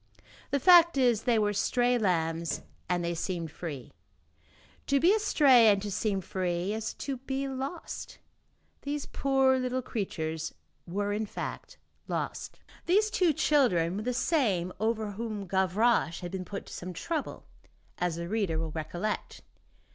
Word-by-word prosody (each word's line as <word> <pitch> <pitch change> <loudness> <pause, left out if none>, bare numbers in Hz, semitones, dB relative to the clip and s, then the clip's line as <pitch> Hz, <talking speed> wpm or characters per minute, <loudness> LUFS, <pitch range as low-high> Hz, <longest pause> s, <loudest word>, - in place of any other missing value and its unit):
The 280 - +1
fact 340 0 +7
is, 240 -5 +3
they 240 -3 +3
were 210 -1 +2
stray 245 +4 +2
lambs 165 -5 0 0.3
and 175 -1 +1
they 170 - -1
seemed 170 -2 -3
free. 145 -8 -7 0.9
To 280 - +3
be 350 +7 +5
astray 285 - +5
and 200 -2 +5
to 205 - -4
seem 195 -1 -1
free 180 +1 -2
is 220 0 -4
to 275 -2 -4
be 270 +2 -3
lost. 270 +5 -6 0.6
These 290 +1 -3
poor 270 -1 +2
little 255 0 -1
creatures 160 -8 -3 0.3
were, 205 +3 -1
in 215 +1 -2
fact, - - -6 0.3
lost. - - -4 0.3
These 425 +4 +3
two 360 -5 +3
children 215 - +2
were - - -2
the 250 +3 -1
same 230 - +1
over 220 -1 0
whom 215 -1 -5
Gavroche 190 +1 +1
had 175 -1 -6
been 185 -1 -4
put 200 +1 -6
to - - -11
some 180 +1 -6
trouble, 310 - -4 0.5
as 180 -2 0
the 170 0 -5
reader 195 -5 0
will 160 -1 -2
recollect. 175 +7 -4
210 Hz, 150 wpm, -29 LUFS, 175-265 Hz, 0.9 s, fact